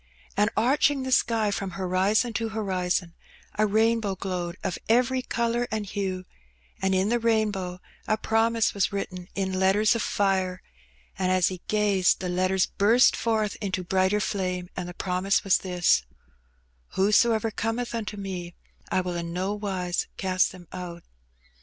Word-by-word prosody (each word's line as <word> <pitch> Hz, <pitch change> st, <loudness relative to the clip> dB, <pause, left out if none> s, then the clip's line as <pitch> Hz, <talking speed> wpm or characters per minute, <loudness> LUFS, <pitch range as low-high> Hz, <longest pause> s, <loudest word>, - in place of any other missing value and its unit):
And 210 Hz, +2 st, +3 dB
arching 270 Hz, +4 st, +3 dB
the 260 Hz, -, -3 dB
sky 225 Hz, -4 st, +2 dB
from 195 Hz, -2 st, -3 dB
lorizon 195 Hz, +5 st, +1 dB
to 225 Hz, 0 st, -1 dB
horizon, 185 Hz, -5 st, -1 dB, 0.4 s
a 215 Hz, 0 st, +2 dB
rainbow 220 Hz, -1 st, +2 dB
glowed 180 Hz, -2 st, -4 dB
of 180 Hz, -, -2 dB
every 250 Hz, +3 st, +3 dB
colour 235 Hz, 0 st, -1 dB
and 215 Hz, -2 st, -4 dB
lue, 185 Hz, -2 st, -2 dB, 0.6 s
and 190 Hz, 0 st, +2 dB
in 190 Hz, +2 st, +2 dB
the 240 Hz, +1 st, +2 dB
rainbow 210 Hz, -6 st, 0 dB, 0.3 s
a 215 Hz, -, +2 dB
promise 225 Hz, +1 st, +1 dB
was 200 Hz, -3 st, +1 dB
written 185 Hz, -3 st, -5 dB
in 190 Hz, -1 st, -1 dB
letters 200 Hz, +4 st, +4 dB
of 230 Hz, -, -1 dB, 0.2 s
ire, 190 Hz, -2 st, +1 dB, 0.6 s
and 185 Hz, -1 st, +1 dB
as 185 Hz, -2 st, +3 dB
he 185 Hz, -2 st, -7 dB
gazed 205 Hz, -4 st, +2 dB
the 185 Hz, -, -3 dB
letters 185 Hz, +1 st, +2 dB
burst 225 Hz, +5 st, +4 dB
forth 220 Hz, -3 st, 0 dB
into 190 Hz, -3 st, -2 dB
brighter 190 Hz, +3 st, +2 dB
3ame, 185 Hz, -3 st, -2 dB
and 180 Hz, -1 st, -4 dB
the 175 Hz, -, -9 dB
promise 185 Hz, +1 st, 0 dB
was 195 Hz, -, +3 dB
this, 180 Hz, -, +2 dB, 0.9 s
"Whosoever 220 Hz, +3 st, +3 dB
cometh 225 Hz, +3 st, -2 dB
unto 215 Hz, -2 st, -4 dB
Me, 180 Hz, -3 st, -6 dB, 0.3 s
I 185 Hz, -, +1 dB
will 180 Hz, -1 st, -4 dB
in 170 Hz, -1 st, -4 dB
no 190 Hz, +3 st, -1 dB
wise 190 Hz, -4 st, -2 dB
cast 185 Hz, -1 st, +1 dB
them 180 Hz, -2 st, -13 dB
out." 175 Hz, -2 st, -7 dB
195 Hz, 155 wpm, -26 LUFS, 185-220 Hz, 0.9 s, letters